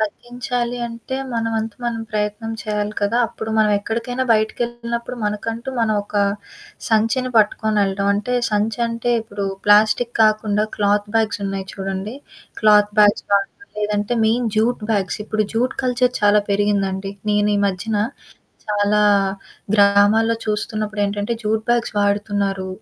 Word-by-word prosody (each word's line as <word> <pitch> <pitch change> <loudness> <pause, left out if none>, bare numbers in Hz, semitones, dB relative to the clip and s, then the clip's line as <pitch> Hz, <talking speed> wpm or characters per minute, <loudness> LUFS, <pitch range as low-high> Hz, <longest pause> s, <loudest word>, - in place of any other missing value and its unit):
తగ్గించాలి 245 +2 -3
అంటే 230 +3 -6 0.2
మన 230 -1 -1
వంతు 220 -1 -3
మనం 230 -1 -2
ప్రయత్నం 210 +2 -2
చేయాలి 210 0 -2
కదా! 205 +3 +1
అప్పుడు 220 -1 -7
మనం 215 -1 +4
ఎక్కడికైనా 235 +4 -3
బయటికిెళ్తునప్పుడు, 235 +2 -2
మనకంటూ 225 +4 -3
మనం 220 -1 +2
ఒక - - -18 0.7
సంచిని 225 +4 +1
పట్టుకొని 215 0 +2
వెళ్ళడం. 200 0 -1
అంటే 210 +5 -2 0.2
సంచంటే 230 +3 -1
ఇప్పుడు 205 -2 -5 0.2
ప్లాస్టిక్ 215 +3 +4
కాకుండా 215 -1 +2
క్లాత్ 205 0 +1
బ్యాగ్స్ 220 -2 0
ఉన్నాయి 195 -1 -4
చూడండి. 195 +3 -4 0.5
క్లాత్ 210 -1 +5
బ్యాగ్స్ 205 -1 +4
గాని 200 0 +2 0.3
లేదంటే 210 +2 -1
మెయిన్ 235 +2 +1
జూట్ 230 +3 +2
బ్యాగ్స్. 195 -2 -1
ఇప్పుడు 215 0 0
జూట్ 250 +3 0
కల్చర్ 250 0 +1
చాలా 205 0 +5
పెరిగిందండి. 200 -1 0 0.2
నేనీ 205 0 +2
మధ్యన 200 +3 -2 0.7
చాలా 210 0 +2 0.7
గ్రామాల్లో 205 +3 +4
చూస్తున్నప్పుడేంటంటే, 210 0 -2
జూట్ 220 0 0
బ్యాగ్స్ 240 0 +1
వాడుతున్నారు, 200 -2 0
215 Hz, 125 wpm, -20 LUFS, 205-230 Hz, 0.7 s, క్లాత్